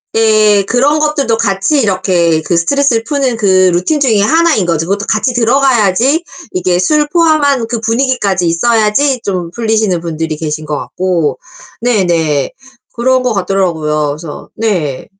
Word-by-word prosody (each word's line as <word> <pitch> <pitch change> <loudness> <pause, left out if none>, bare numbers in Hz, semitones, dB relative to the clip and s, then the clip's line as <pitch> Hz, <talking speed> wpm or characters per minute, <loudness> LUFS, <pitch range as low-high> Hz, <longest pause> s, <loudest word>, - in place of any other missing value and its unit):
예. 215 -2 +3
그런 270 +8 +1
것들도 280 -7 0
같이 200 +7 0
이렇게 180 -5 +1
그 170 +2 -1
스트레스를 240 +5 +1
푸는 270 -4 -1
그 185 -3 +3
루틴 185 - 0
중에 225 -7 +2
하나인 315 - +2
거죠. 165 -1 -1
그것도 200 +1 -2
같이 235 +4 0
들어가야지 245 - +2 0.3
이게 180 -1 0
술 300 +10 +2
포함한 290 -8 +2
그 235 -1 -3
분위기까지 225 -6 0
있어야지 230 +8 +1
좀 180 -4 -3
풀리시는 220 -4 0
분들이 160 -1 -4
계신 155 0 -4
것 150 -1 -3
같고 180 -4 -2 0.4
네네 170 - 0 0.4
그런 255 +2 +1
것 250 -3 -1
같더라고요. 165 -6 -1
그래서 150 +1 -8
네. 180 -12 -2
210 Hz, 325 characters per minute, -12 LUFS, 175-250 Hz, 0.4 s, 예